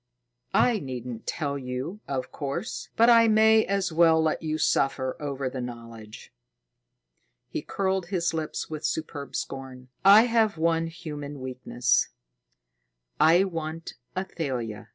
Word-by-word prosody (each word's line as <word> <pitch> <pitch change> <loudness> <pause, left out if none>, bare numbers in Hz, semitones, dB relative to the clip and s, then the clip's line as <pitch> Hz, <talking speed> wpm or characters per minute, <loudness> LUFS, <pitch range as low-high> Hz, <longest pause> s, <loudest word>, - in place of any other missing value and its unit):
"I 235 -4 +4
needn't 125 -5 -7
tell 140 -2 -2
you, 130 +9 -5
of 130 -2 -3
course, 145 +8 -4
but 230 - +5
I 230 -1 +7
may 220 0 +5
as 195 -2 -1
well 165 0 +5
let 160 -1 +1
you 155 -1 -2
suffer 135 -3 +1
over 140 -2 -3
the 130 0 -4
knowledge." 115 -3 -9 1.2
He - - -3
curled 190 -2 -1
his 175 -3 -1
lips 160 -1 -3
with 155 0 -6
superb 150 -3 -4
scorn. 130 -1 -6
"I 200 +3 +9
have 225 -5 +2
one 165 0 +1
human 150 -4 -7
weakness. 125 -1 0 1.1
I 165 +5 +6
want 165 -3 -5 0.2
Athalia." 130 - -4
155 Hz, 130 wpm, -26 LUFS, 130-185 Hz, 1.2 s, I